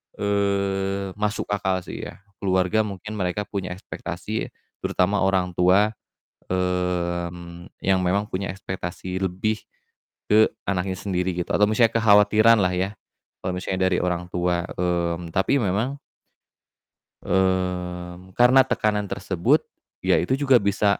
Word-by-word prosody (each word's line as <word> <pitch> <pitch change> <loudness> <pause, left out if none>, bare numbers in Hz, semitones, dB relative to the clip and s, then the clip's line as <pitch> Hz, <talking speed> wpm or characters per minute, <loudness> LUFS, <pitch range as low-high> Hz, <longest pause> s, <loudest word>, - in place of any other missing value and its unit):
eee, 100 -1 0
masuk 105 0 0
akal 95 -2 0
sih - - -6
ya. - - -13 0.2
Keluarga 95 +2 +1
mungkin 100 +2 -7
mereka 90 +2 -1
punya 95 -3 -5
ekspektasi, 95 +3 -5 0.3
terutama 100 +3 +1
orangtua, 95 +2 +3 0.6
mmm, 85 -1 -2 0.2
yang 95 0 +3
memang 100 +4 0
punya 95 +1 -3
ekspektasi 95 -1 -5
lebih 95 +3 -1 0.9
ke - - +4 0.2
anaknya 95 -1 -1
sendiri, 90 -2 -2
gitu, 90 - -2
atau 105 0 +4
misalnya 115 +1 +3
kekhawatiran 110 +1 +5
lah 90 0 +1
ya, 90 +2 0 0.5
kalo 95 - -1
misalnya 95 0 -1
dari 90 - +2
orang 90 -1 -1
tua, 90 -1 0
mmm, 85 -1 -1
tapi 115 +9 +2
memang 115 +8 -1 1.2
mmm, 90 -1 -1
karena 125 +2 +6
tekanan 105 -3 0
tersebut, 95 -3 +1 0.4
ya - - +4
itu 90 +10 +1
juga 135 -3 +4
bisa, 100 0 +1
95 Hz, 125 wpm, -24 LUFS, 90-100 Hz, 1.2 s, karena